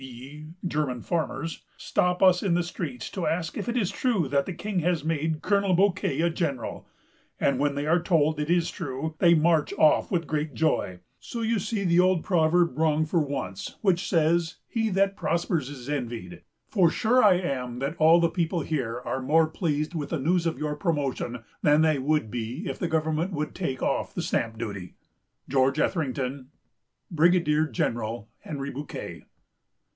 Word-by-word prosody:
e., 135 +4 -10 0.2
German 150 -7 -1
farmers_) 160 +2 -3 0.2
stop 180 +1 0
us 185 -1 +6
in 185 -4 +1
the 175 - +1
streets 210 +8 -5
to 180 -5 -3
ask 165 +1 -2
if 210 - -4
it 240 - -1
is 200 -7 0
true 220 - 0
that 140 +1 +1
the 185 - -3
King 200 +2 -2
has 170 -2 0
made 160 0 -1
Colonel 200 -2 +2
Bouquet 180 -6 +1
a 170 - +3
general; 140 -8 -3 0.5
and, 135 -2 +1
when 145 0 +1
they 145 +1 -2
are 165 +3 +3
told 155 -3 +2
it 150 +1 -2
is 175 -1 +2
true, 155 -2 -4
they 170 -1 +6
march 160 -1 +2
off 155 - +3
with 170 -3 0
great 150 -1 -2
joy; 95 - 0 0.2
so 235 - -6
you 225 -1 +1
see 210 +1 -2
the 175 -1 +3
old 180 -2 +3
proverb 170 -3 +2
wrong 155 -1 +2
for 165 +2 +1
once, 135 - -4
which 190 -3 +1
says, 165 -1 +2
he 225 -1 -1
that 195 0 +1
prospers 170 -6 -1
is 135 -3 -9
envied; 115 -11 -4 0.3
for 185 -6 +3
sure 245 +8 +3
I 200 -3 +7
am 130 -9 -3
that 140 +5 -3
all 160 +2 +6
the 170 - +4
people 170 0 -1
here 125 -6 -2
are 130 - -2
more 155 +5 +4
pleased 155 -1 -2
with 155 -4 -4
the 165 - -1
news 170 +4 +1
of 165 - -2
your 150 -1 -2
promotion 140 - -2 0.2
than 150 +1 +4
they 155 -3 +3
would 145 -5 0
be 125 - -4
if - - -4
the 175 - -1
government 160 +3 0
would 150 -1 -3
take 135 -8 -3
off - - -1
the - - -2
stamp 115 -1 -1
duty.... 100 -6 -6 0.5
"GEO. 130 -1 +3
ETHERINGTON. 135 -3 -1 0.6
"BRIGADIER 160 -2 +3
GENERAL 115 -3 -2
HENRY 140 -2 -5
BOUQUET." 145 +2 -7
155 Hz, 180 wpm, -26 LUFS, 140-175 Hz, 0.6 s, I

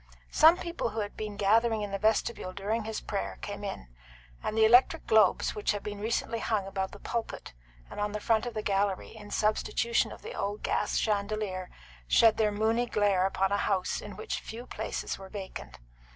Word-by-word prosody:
Some 325 +3 +7
people 340 -8 -3
who 220 0 -3
had 205 - -5
been 210 -1 -5
gathering 220 +2 +3
in 205 - -4
the 195 - -2
vestibule 215 -3 0
during 210 +3 -2
his 220 0 -4
prayer 200 - -3
came 205 0 -5
in; 195 - -5 0.5
and 215 - -3
the 220 - +6
electric 245 +8 +5
globes, 215 -4 +4
which 210 - 0
had 205 - -5
been 205 -1 -5
recently 230 +1 -1
hung 215 -3 0
above 190 -1 -2
the - - -11
pulpit 230 - -5 0.3
and - - -8
on 205 0 0
the 210 - -3
front 225 +2 +1
of 240 - -6
the 215 - -2
gallery 195 0 0
in 205 -1 -11
substitution 215 +2 +1
of - - -11
the 455 +3 -6
old 205 +1 -3
gas 210 - 0
chandelier, 200 -3 -1 0.4
shed 225 - +5
their 215 -1 +2
moony 225 +3 +1
glare 200 -4 +2
upon 195 0 0
a 200 - +2
house 195 -2 0
in - - -8
which 440 - -4
few 235 +2 -8
places - - -4
were 190 0 -10
vacant. 195 -2 -7
210 Hz, 195 wpm, -29 LUFS, 200-225 Hz, 0.5 s, Some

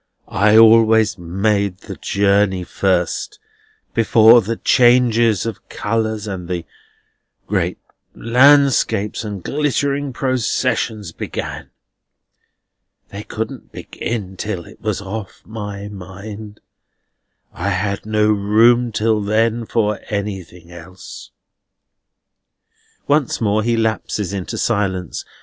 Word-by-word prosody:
I 105 +2 +3
always 110 -2 +5
made 100 +2 -1
the - - -8
journey 100 -2 +1
first, 95 - -1 0.6
before 115 +1 +6
the 115 +3 -3
changes 120 -4 +3
of 115 -3 -7
colours 110 0 -2
and 95 -4 -6
the 85 -2 -3 0.8
great - - -1 0.4
landscapes 125 -4 +3
and 100 -4 -6
glittering 145 -1 -1
processions 120 - -1
began. - - -6 1.4
They 100 - -7
couldn't 110 +4 -6
begin 100 -5 -6
till 95 -5 -4
it - - -16
was 105 -3 -2
off 100 0 -7
my 105 -2 -7
mind. 105 +2 -10 0.9
I 95 +3 -3
had 100 +1 -2
no 110 0 +1
room 115 +4 +3
till 110 0 +1
then 115 +2 0
for 105 -3 0
anything 95 -5 -5
else." 85 +2 -11 1.8
Once 145 -3 +1
more 110 -1 +1
he 115 +1 0
lapses 110 -3 -2
into 95 -3 -4
silence. 95 -6 -2
105 Hz, 100 wpm, -19 LUFS, 100-115 Hz, 1.8 s, before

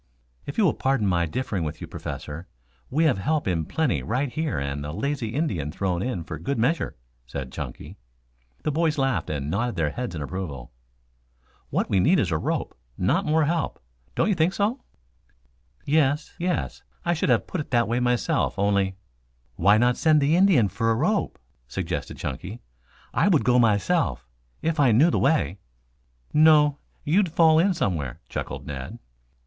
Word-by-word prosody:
"If 140 - -6
you 220 - +4
will 175 - +4
pardon 135 -5 0
my 85 -3 +1
differing 100 -1 -2
with 75 0 -4
you, - - -6
Professor, 80 +5 -7 0.4
we 155 +5 +1
have 140 -11 +3
help 155 +6 0
in 85 -4 0
plenty 160 -5 0
right 125 +4 -1
here 160 -1 -1
and 70 +1 -3
a 75 - -5
lazy 140 - -2
Indian 95 - -1
thrown 90 +1 -1
in 100 -7 -2
for - - -7
good 140 -1 -2
measure," 135 +9 0 0.3
said 65 0 -6
Chunky. - - -7 0.7
The 150 - 0
boys 160 0 +1
laughed 135 -2 0
and 70 -2 -3
nodded 115 +3 -1
their 80 -4 0
heads 120 -5 -4
in 75 - -4
approval. 70 -8 -6 1.0
"What - - 0
we 100 - +2
need 165 - +4
is 95 -9 0
a 80 - +1
rope, - - -2 0.2
not 150 - +1
more 155 +1 +3
help. 165 0 -1 0.4
Don't - - +2
you 210 - +3
think 170 +1 +2
so?" 220 +6 0 1.0
"Yes, 145 0 +1
yes. 180 +1 -2 0.2
I 175 - +2
should 160 - -1
have 120 -3 +3
put 180 - -3
it - - -9
that 120 -2 +2
way 120 +2 0
myself 125 -1 0
only 100 -1 +1 0.3
" - - -41
"Why 100 - +4
not 120 +2 +3
send 155 -1 +4
the 145 +3 +3
Indian 175 - +5
for 115 +4 -1
a 115 - +3
rope?" 180 - 0 0.3
suggested - - -4
Chunky. 90 - -5 0.5
"I - - +3
would - - +4
go 125 0 +4
myself 115 - +1 0.4
if 165 -1 0
I 130 -5 +5
knew 150 +10 +5
the - - +1
way." 125 - +1 0.7
"No, 150 -2 +5 0.2
you'd 180 +3 +2
fall 160 -1 +5
in 185 +2 +3
somewhere," 75 - -2
chuckled - - -5
Ned. 65 -2 -6
125 Hz, 175 wpm, -25 LUFS, -, 1.0 s, Indian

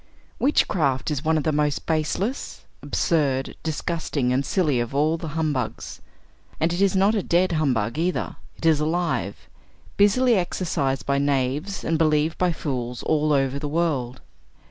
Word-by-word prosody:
Witchcraft 155 - +1
is 145 -1 -2
one 160 0 +2
of 155 - -1
the 155 - +1
most 150 -1 0
baseless, 165 - -2 0.2
absurd, 140 -6 0
disgusting 155 -5 -1
and 135 +2 +1
silly 150 -5 +1
of 120 +3 -3
all 155 +3 +2
the 165 0 -6
humbugs. 150 -5 -2 0.6
And 165 +2 +1
it 175 - -1
is 200 -1 +3
not 195 +3 +4
a 210 - +1
dead 180 +1 +2
humbug 135 -6 0
either; 180 +2 -1 0.2
it - - -7
is 160 -2 +4
alive, 170 +3 -2 0.5
busily 235 +5 +4
exercised 165 -8 -1
by 140 0 +1
knaves 140 +6 -1
and 165 -1 0
believed 155 0 +2
by 180 -1 +2
fools 125 -6 -4
all 155 -1 +1
over 135 -1 +1
the 145 0 -4
world. 145 -6 -1
155 Hz, 155 wpm, -24 LUFS, 140-170 Hz, 0.6 s, not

